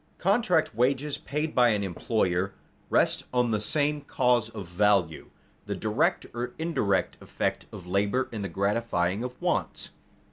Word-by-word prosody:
_Contract 190 -4 +2
wages, 135 +5 0
paid 150 +3 -3
by 125 -1 +5
an 105 -2 +1
employer, 95 0 -1 0.3
rest - - +2
on 125 -2 +2
the 105 - +1
same 145 +7 0
cause 125 -5 +1
of 105 -4 -7
value, 90 -3 +1 0.4
the - - -2
direct - - 0
or 120 +1 -4
indirect 160 - 0
effect - - -3
of 90 - -9
labor 100 +8 +1
in 110 -3 -5
the 100 - -3
gratifying 100 0 0
of 125 0 -6
wants. - - -2
115 Hz, 145 wpm, -27 LUFS, 100-130 Hz, 0.4 s, by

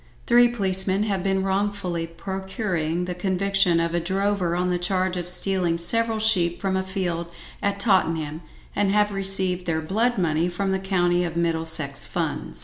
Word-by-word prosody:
Three 240 0 +6
policemen 195 -3 +1
have 195 -4 -1
been 195 -1 0
wrongfully 195 -3 -1
procuring 180 -1 -3
the 180 - -3
conviction 190 -1 +1
of 165 0 -1
a 175 - +1
drover 190 0 0
on 180 +1 0
the 175 - 0
charge 185 0 0
of 175 -1 -4
stealing 180 -2 0
several 225 +6 +2
sheep 185 -6 +3
from 195 -1 -1
a 190 - +1
field 180 -3 -3 0.3
at 200 0 -1
Tottenham, 165 -7 +1 0.3
and 205 -1 +1
have 210 +1 +2
received 190 -2 0
their 160 -1 0
"blood 220 +9 0
money" 170 -1 +1
from 195 +2 -2
the 190 - 0
County 180 -2 +1
of 170 -1 -4
Middlesex 160 -4 -1
funds. - - -4
185 Hz, 165 wpm, -24 LUFS, 170-195 Hz, 0.3 s, Three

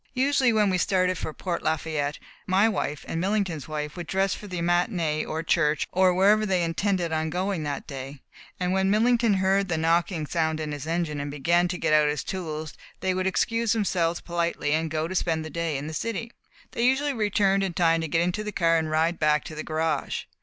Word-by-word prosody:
Usually 265 -1 +3
when 210 -3 +3
we 180 - +1
started 185 -1 +2
for - - -4
Port 170 +2 -4
Lafayette, 155 -2 -1 0.3
my 195 +3 +4
wife 175 -9 -2
and 165 - -2
Millington's 190 -7 -1
wife 150 -1 -4
would 175 -2 -6
dress 195 +1 +1
for 210 - -8
the 180 -2 -5
matinée 175 -3 0
or 160 +1 -2
church, 150 -4 +1
or 185 0 +4
wherever 200 +4 +4
they 190 -4 +1
intended 175 +1 0 0.2
going 185 0 -1
that 145 -2 -4
day, 135 0 -7 0.4
and 180 0 0
when 190 0 +2
Millington 230 +1 +3
heard 190 +1 +2
the 170 -3 -1
knocking 165 0 +1
sound 160 0 -1
in 155 -1 -3
his 145 +1 -6
engine 165 -3 -1
and 145 0 -4
began 170 +5 +2
to 180 0 -3
get 155 - 0
out 150 -1 +5
his 150 0 -2
tools, 155 -4 -5 0.3
they 190 0 +1
would 185 +1 -1
excuse 230 +4 +1
themselves 175 -6 0
politely 170 -3 -1
and 160 +1 +1
go 155 0 -1
and 185 +3 -5
spend 160 -3 0
the 155 - -7
day 165 -3 -2
in 140 - -5
the 160 - -6
city. 230 +6 -3 0.4
They 235 - -2
usually 270 +3 +2
returned 200 -3 +2
in 190 -3 -2
time 165 -1 +3
to 160 - -2
get 165 +2 +1
into 180 +5 -1
the 210 - -4
car 165 -4 +2
and 160 -1 -3
ride 160 +2 +1
back 150 -1 +2
to - - -8
the 155 - -5
garage. 160 0 -1
175 Hz, 215 wpm, -26 LUFS, 155-195 Hz, 0.4 s, out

